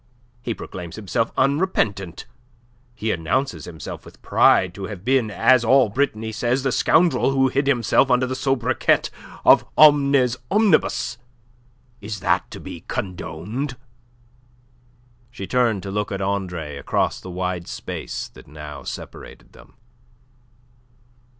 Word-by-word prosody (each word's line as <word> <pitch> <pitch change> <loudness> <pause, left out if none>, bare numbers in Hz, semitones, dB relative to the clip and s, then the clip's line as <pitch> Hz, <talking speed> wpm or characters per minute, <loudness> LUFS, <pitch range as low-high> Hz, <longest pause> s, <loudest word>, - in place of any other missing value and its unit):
He 115 -2 -3
proclaims 85 -3 -8
himself 110 +2 -1
unrepentant. 130 - 0 0.7
He 110 -1 -2
announces 90 - -1
himself 80 -2 -8
with - - -15
pride 90 -2 +4
to 100 0 -6
have 100 -1 -8
been, 130 -3 +2
as 125 +4 +4
all 130 0 +4
Brittany 110 -2 -1
says, 120 +4 0
the 135 - +1
scoundrel 165 +3 +3
who 135 -1 +2
hid 140 +2 0
himself 125 0 +3
under 125 +1 +3
the 130 +1 -3
sobriquet 130 -2 +1 0.3
of - - +7
Omnes 140 -4 +5
Omnibus. 205 - +2 0.8
Is 105 0 -5
that - - +1
to - - -9
be - - -9
condoned?" 100 - -4 1.5
She 100 -5 -7
turned 115 -4 +1
to 100 - -5
look 105 +1 -2
at 100 - -3
Andre 90 -7 -3
across - - -1
the 95 - -9
wide 90 -1 -3
space - - -5
that - - -16
now 75 -1 -9
separated - - -9
them. - - -18
115 Hz, 130 wpm, -22 LUFS, 95-135 Hz, 1.5 s, of